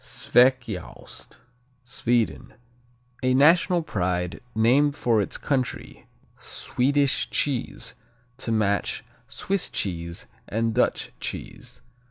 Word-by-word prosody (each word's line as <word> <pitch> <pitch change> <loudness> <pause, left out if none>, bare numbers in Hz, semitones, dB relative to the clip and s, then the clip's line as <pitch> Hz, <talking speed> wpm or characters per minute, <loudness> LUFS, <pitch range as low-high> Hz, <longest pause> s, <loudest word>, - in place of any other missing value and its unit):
Sveciaost 120 -6 0 0.5
Sweden 120 -3 -1 0.7
A 130 0 +2
national 170 +5 +5
pride, 90 - -2
named 135 +6 +4
for 120 -7 +2
its - - -3
country, 130 -4 -3 0.3
Swedish 140 +2 0
cheese, 130 -4 -1 0.4
to 120 - -3
match 100 -3 0 0.2
Swiss 195 -1 -2
cheese 85 -3 -3 0.2
and 115 +1 0
Dutch - - +1
cheese. - - -7
120 Hz, 90 wpm, -25 LUFS, 105-140 Hz, 0.7 s, national